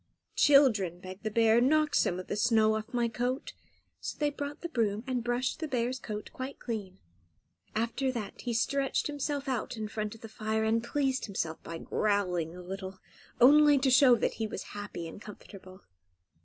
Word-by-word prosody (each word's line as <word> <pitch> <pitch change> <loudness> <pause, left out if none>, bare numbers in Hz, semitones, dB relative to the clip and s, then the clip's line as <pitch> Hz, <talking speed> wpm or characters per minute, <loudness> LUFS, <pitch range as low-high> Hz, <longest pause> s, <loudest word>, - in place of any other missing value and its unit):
"Children," 220 - +4
begged 185 +1 -9
the 220 - -2
bear; 225 +1 +4
"knock 305 +3 +3
some 180 - +2
of 185 - -6
the - - -3
snow 220 0 +3
off 220 0 -5
my 240 -1 +1
coat." 245 +3 -3 0.5
So - - -5
they 295 -1 +1
brought 285 0 -6
the 340 - -4
broom 220 -6 0
and 255 -3 -2
brushed 245 +4 -1
the 320 - -3
bear's 255 -1 -1
coat 210 -3 -6
quite 260 +2 -6
clean. 205 -6 -5 0.8
After 235 +4 0
that 230 -5 -6
he 245 - -3
stretched 270 +4 0
himself 290 -1 -3
out 250 -2 -2
in 215 -1 -3
front 215 0 -4
of 225 - -16
the 225 - -8
fire, 220 0 -2
and 225 +1 +1
pleased 265 +1 0
himself 165 -5 -3
by 165 - -7
growling 180 -5 -1
a 180 - -9
little, 190 +1 -6 0.4
only 290 +3 +7
to 265 -1 +2
show 255 -1 +7
that 230 - 0
he 220 - 0
was - - -6
happy 205 -5 -6
and 165 - -10
comfortable. 190 -2 -12
230 Hz, 185 wpm, -30 LUFS, 205-260 Hz, 0.8 s, only